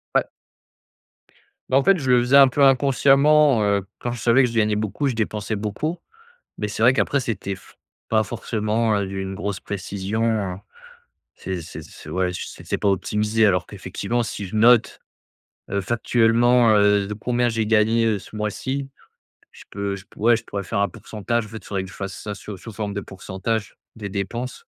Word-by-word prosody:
Ouais. -, -, +2 dB, 1.4 s
Bah 130 Hz, -, +4 dB
en 135 Hz, -, +3 dB
fait, 195 Hz, +2 st, +4 dB
je 130 Hz, -3 st, -3 dB
le 125 Hz, -1 st, +6 dB
faisais 125 Hz, +3 st, +2 dB
un 140 Hz, -1 st, +9 dB
peu 140 Hz, +2 st, +1 dB
inconsciemment, 135 Hz, 0 st, +4 dB
heu, 100 Hz, -2 st, +1 dB
quand 120 Hz, -, -3 dB
je 120 Hz, -, -5 dB
savais 120 Hz, +3 st, +4 dB
que 125 Hz, -, +2 dB
je 115 Hz, -, -8 dB
gagnais 105 Hz, -1 st, +2 dB
beaucoup, 105 Hz, +7 st, -1 dB
je 130 Hz, -, 0 dB
dépensais 110 Hz, -1 st, -2 dB
beaucoup. 110 Hz, -, -3 dB, 0.6 s
Mais 105 Hz, -, -1 dB
c'est 110 Hz, +1 st, -3 dB
vrai 125 Hz, +2 st, +6 dB
qu'après, 140 Hz, +1 st, +1 dB
c'était 100 Hz, -6 st, -3 dB
f 95 Hz, -, -18 dB, 0.3 s
pas 110 Hz, -1 st, +3 dB
forcément, 110 Hz, 0 st, -1 dB
heu, 100 Hz, -1 st, -1 dB
d'une 95 Hz, 0 st, -4 dB
grosse 100 Hz, 0 st, -4 dB
précision. 100 Hz, 0 st, -2 dB, 0.8 s
C'est 95 Hz, -1 st, -5 dB
c'est 80 Hz, -, -9 dB
c'est -, -, -13 dB
ouais 90 Hz, -1 st, 0 dB
ch 90 Hz, -, -5 dB
c'est -, -, -12 dB
c'est -, -, -2 dB
pas 100 Hz, -, +1 dB
optimisé 105 Hz, +3 st, +1 dB
alors 90 Hz, -3 st, +2 dB
qu'effectivement, 100 Hz, +4 st, -3 dB
si 110 Hz, -2 st, -5 dB
je 95 Hz, -, -9 dB
note, 115 Hz, +1 st, +4 dB, 0.7 s
heu, 100 Hz, -, 0 dB
factuellement, 120 Hz, +2 st, +3 dB
heu, 105 Hz, -1 st, +3 dB
de 105 Hz, -, -4 dB
combien 120 Hz, +3 st, 0 dB
j'ai 115 Hz, -2 st, -1 dB
gagné, 110 Hz, +1 st, +3 dB
heu, 110 Hz, -3 st, +1 dB
ce 110 Hz, -, -12 dB
mois-ci. 130 Hz, +6 st, -3 dB, 0.6 s
Je -, -, -14 dB
peux 100 Hz, 0 st, -3 dB
je 95 Hz, -1 st, -9 dB
p -, -, -47 dB
ouais, 120 Hz, +3 st, +4 dB
je 110 Hz, -, -7 dB
pourrais 100 Hz, -1 st, -5 dB
faire 100 Hz, +1 st, -2 dB
un 100 Hz, -, +2 dB
pourcentage. 110 Hz, +5 st, -3 dB
En -, -, -13 dB
fait 110 Hz, -, -8 dB
il -, -, -19 dB
faudrait 95 Hz, -2 st, -3 dB
que -, -, -10 dB
je -, -, -13 dB
fasse 95 Hz, -1 st, -6 dB
ça 105 Hz, -, -5 dB
sous 100 Hz, 0 st, -8 dB
sous 115 Hz, -, -10 dB
forme 105 Hz, -1 st, -4 dB
de 100 Hz, -, -2 dB
pourcentage 100 Hz, +3 st, -4 dB, 0.2 s
des 105 Hz, -2 st, -6 dB
dépenses 115 Hz, +6 st, -5 dB
110 Hz, 200 wpm, -22 LUFS, 100-120 Hz, 1.4 s, un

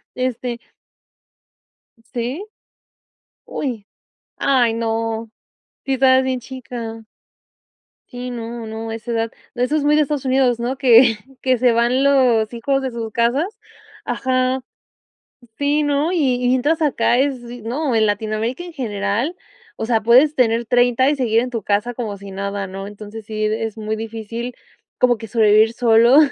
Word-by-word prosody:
Este 250 Hz, -1 st, -3 dB, 1.6 s
¿Sí? 250 Hz, -, -3 dB, 1.0 s
Uy. 235 Hz, -8 st, -4 dB, 0.5 s
Ay 245 Hz, -4 st, +3 dB
no, 225 Hz, -1 st, -2 dB, 0.5 s
sí 270 Hz, -, 0 dB
estabas 260 Hz, 0 st, +5 dB
bien 260 Hz, -1 st, -1 dB
chica. 230 Hz, -3 st, -7 dB, 1.0 s
Sí, 250 Hz, 0 st, -6 dB
no, 235 Hz, -1 st, -6 dB
no, 225 Hz, +1 st, -6 dB
a 225 Hz, -, -3 dB
esa 235 Hz, +1 st, -6 dB
edad. 225 Hz, 0 st, -1 dB, 0.2 s
Eso 250 Hz, +5 st, 0 dB
es 305 Hz, -, +1 dB
muy 295 Hz, +1 st, +4 dB
de 305 Hz, -, +4 dB
Estados 285 Hz, -1 st, -3 dB
Unidos, 255 Hz, -2 st, +2 dB
¿no? 250 Hz, +3 st, -2 dB
Que, 240 Hz, -3 st, +6 dB, 0.2 s
que 260 Hz, -1 st, +2 dB
se 245 Hz, +1 st, +4 dB
van 240 Hz, +3 st, +2 dB
los 245 Hz, -5 st, +3 dB
hijos 270 Hz, +4 st, 0 dB
de 260 Hz, -1 st, -3 dB
sus 225 Hz, -2 st, -5 dB
casas. 240 Hz, -, +1 dB, 0.6 s
Ajá. 255 Hz, 0 st, 0 dB, 1.0 s
Sí, 290 Hz, +1 st, +2 dB
¿no? 290 Hz, +3 st, +1 dB
Y 260 Hz, -8 st, +1 dB
y -, -, +2 dB
mientras 290 Hz, +6 st, +1 dB
acá 280 Hz, -4 st, +2 dB
es, 270 Hz, -1 st, +1 dB, 0.2 s
no, 260 Hz, +4 st, -2 dB
en 220 Hz, -1 st, +3 dB
Latinoamérica 215 Hz, -, -2 dB
en 350 Hz, -2 st, -9 dB
general. 225 Hz, -, -2 dB, 0.4 s
O 220 Hz, -, -4 dB
sea, 225 Hz, -2 st, +1 dB
puedes 255 Hz, +7 st, +5 dB
tener 235 Hz, -1 st, +2 dB
30, 245 Hz, +2 st, +3 dB
y 295 Hz, -, +1 dB
seguir 235 Hz, -5 st, +2 dB
en 250 Hz, -, -4 dB
tu 230 Hz, -3 st, -3 dB
casa 210 Hz, +5 st, 0 dB
como 220 Hz, -4 st, -4 dB
si 200 Hz, 0 st, -10 dB
nada, 200 Hz, +1 st, -3 dB
¿no? 195 Hz, +1 st, -7 dB
Entonces 210 Hz, +1 st, -9 dB
sí 215 Hz, 0 st, -2 dB
es 220 Hz, 0 st, -2 dB
muy 215 Hz, 0 st, -3 dB
difícil, 225 Hz, +2 st, -6 dB, 0.4 s
como 245 Hz, -2 st, +3 dB
que 225 Hz, -, -7 dB
sobrevivir 220 Hz, 0 st, +4 dB
solo, 235 Hz, +3 st, +5 dB
240 Hz, 155 wpm, -20 LUFS, 225-260 Hz, 1.6 s, Que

